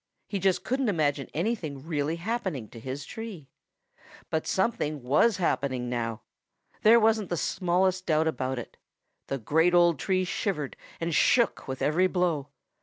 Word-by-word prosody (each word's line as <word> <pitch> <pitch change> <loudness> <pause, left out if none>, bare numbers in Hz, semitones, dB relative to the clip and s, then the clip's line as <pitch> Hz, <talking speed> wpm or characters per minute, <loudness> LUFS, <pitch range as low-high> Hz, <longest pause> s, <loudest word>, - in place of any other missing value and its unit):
He 200 - -2
just 185 -1 +1
couldn't 260 -1 0
imagine 145 -6 0
anything 160 - -3
really 155 -1 -1
happening 185 - -3
to 115 - -11
his 130 +4 -6
tree. 205 -11 -8 0.8
But 160 - -1
something 155 - 0
was 150 - +3
happening 130 -8 -1
now. 115 -2 -3 0.6
There 230 +2 +7
wasn't 220 -3 +2
the 175 - -1
smallest 185 +2 0
doubt 160 -1 +3
about 130 -3 -2
it. 120 - -8 0.5
The 135 - -2
great 160 +8 +2
old 175 -4 +4
tree 185 -1 +1
shivered 180 -6 -2 0.2
and 165 0 -2
shook 235 +8 +3
with 130 -1 -4
every 175 +5 +3
blow. 175 -6 0
165 Hz, 150 wpm, -28 LUFS, 140-190 Hz, 0.8 s, There